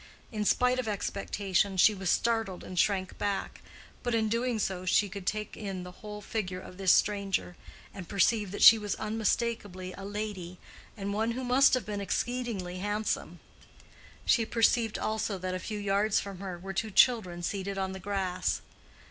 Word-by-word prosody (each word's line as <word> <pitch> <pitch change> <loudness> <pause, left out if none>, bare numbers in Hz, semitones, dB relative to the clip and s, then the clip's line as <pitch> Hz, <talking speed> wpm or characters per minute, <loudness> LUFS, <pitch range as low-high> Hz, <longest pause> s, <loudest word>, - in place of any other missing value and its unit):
In 210 -2 -2
spite 250 +4 +3
of 250 - -2
expectation, 200 -1 -1
she 210 +4 +6
was 190 -3 -3
startled 225 -5 0
and 180 -1 -4
shrank 190 -1 +1
bank, 200 -1 -2 0.4
but 245 -1 0
in 220 -1 +1
doing 235 +1 0
so 190 -3 -2
she 195 +2 +3
could 190 -1 -8
take 215 0 -2
in 195 -4 -5
the 180 - -8
whole 210 -1 -7
figure 195 -4 -3
of 185 - -11
this 190 -1 +4
stranger 200 -3 +1 0.4
and 185 -3 -9
perceive 205 +1 +2
that 205 - -2
she 225 - +10
was 205 -1 -2
unmistakably 210 -4 -2
a 195 - -9
lady, 200 -3 -5 0.4
and 200 0 -3
one 225 +3 0
who 260 +2 -4
must 255 +2 +5
have 250 -6 -2
been 205 0 -4
exceedingly 200 -4 -2
handsome. 205 +2 -2 0.9
She 230 - +4
perceived, 225 0 +2
also, 215 -2 -1
that 185 0 -3
a 185 - -2
few 215 +3 -5
yards 205 +1 +2
from 195 -2 -7
her 190 -2 -5
were 195 +2 -7
two 220 +3 -1
children 190 -5 +3
seated 195 +1 -3
on 190 -1 -1
the 190 - -6
grass. 190 -2 -1
205 Hz, 175 wpm, -30 LUFS, 190-220 Hz, 0.9 s, she